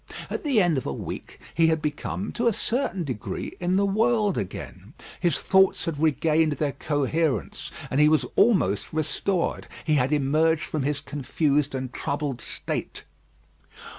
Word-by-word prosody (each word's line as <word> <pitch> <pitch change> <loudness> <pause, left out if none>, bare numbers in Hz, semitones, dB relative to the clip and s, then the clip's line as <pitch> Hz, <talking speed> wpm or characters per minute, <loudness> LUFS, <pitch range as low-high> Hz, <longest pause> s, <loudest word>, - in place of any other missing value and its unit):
At - - -3
the 275 -7 +3
end 175 -7 +3
of - - -7
a - - -1
week, - - -7
he 165 -1 +4
had 160 0 +2
become, 150 +6 -3
to 240 0 0
a 230 - +4
certain 225 -5 -1
degree, 130 -8 -5
in 180 +1 +1
the 200 +1 +3
world 215 0 +2
again; 95 - -6 0.2
his 175 -5 +2
thoughts 190 0 +3
had 160 -4 -3
regained 160 0 +2
their 145 0 -1
coherence, 145 - -1 0.2
and 135 - +1
he 150 - +6
was 155 -1 +3
almost 175 - +3
restored. 165 +3 -1 0.2
He 155 - +2
had 130 +3 0
emerged 155 +3 +2
from 155 - -3
his 140 +1 0
confused 145 +1 0
and 130 -1 -4
troubled 140 -4 -3
state. - - -4
155 Hz, 160 wpm, -25 LUFS, 140-180 Hz, 0.2 s, he